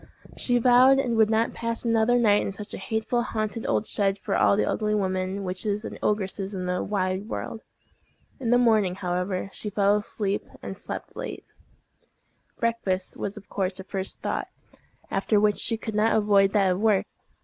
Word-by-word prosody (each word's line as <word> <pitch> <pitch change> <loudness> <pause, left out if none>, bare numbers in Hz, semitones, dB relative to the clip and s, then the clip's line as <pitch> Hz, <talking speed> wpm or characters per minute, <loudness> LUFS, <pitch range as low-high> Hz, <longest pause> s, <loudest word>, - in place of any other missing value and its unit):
She 245 -1 +2
vowed 250 +3 +6
she 275 - 0
would 225 -2 +3
not 225 +1 +1
pass 230 0 -3
another 230 +1 +3
night 210 -4 +4
in - - -2
such 205 +1 -8
a - - -5
hateful 220 +4 -1
haunted 220 -1 -3
old 210 - +1
shed 195 -2 +1
for - - -3
all 200 - +4
the - - +2
ugly 210 -1 0
women, 190 0 -1
witches, 200 +3 -2
and - - -7
ogresses 200 -1 -1
in 185 -1 -3
the 180 0 -1
wide 195 +1 -2
world. 225 - -5 0.8
In 245 -4 -2
the 245 - +5
morning, 215 -6 +3
however, 185 +1 -2
she 210 - -3
fell 205 0 +3
asleep, 205 -1 -2 0.2
and - - -5
slept - - -7
late. - - -6 1.1
Breakfast 215 -6 -1
was 200 +1 -4
of 205 - -11
course 190 -1 -2
her 190 - -5
first 195 0 -4
thought, - - -2 0.6
after 210 - +2
which 210 0 +2
she 225 -1 +2
could 220 0 -6
not 215 +2 +3
avoid 200 -2 +4
that 195 -3 +3
of 180 - -1
work. 215 -2 +3
210 Hz, 180 wpm, -26 LUFS, 195-225 Hz, 1.1 s, vowed